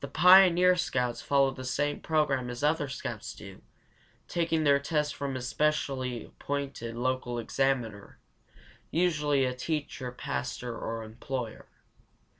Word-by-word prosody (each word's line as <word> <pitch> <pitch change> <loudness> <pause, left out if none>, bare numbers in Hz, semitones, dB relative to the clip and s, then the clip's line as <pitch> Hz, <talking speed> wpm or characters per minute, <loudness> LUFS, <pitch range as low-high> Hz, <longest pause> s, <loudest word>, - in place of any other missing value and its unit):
Pioneer 180 +1 +7
Scouts 125 -8 -1
follow 140 -1 +3
the 130 0 -8
same 145 +3 -1
program 140 -5 0
as 125 +2 -6
other 150 0 +2
scouts 130 - -5
do, - - -11 0.7
taking 165 -2 0
their 140 -1 +5
tests 150 +1 -1
from 140 -2 -4
a 130 - -3
specially 130 -3 -1
appointed 140 -5 -5
local 125 0 -1
examiner, 120 -3 -1 0.7
usually 150 -5 +2
a 125 - -1
teacher, 140 -2 -3
pastor, 120 - -4
or 115 0 -4
employer. 115 +1 -6
135 Hz, 120 wpm, -29 LUFS, 125-150 Hz, 0.7 s, Pioneer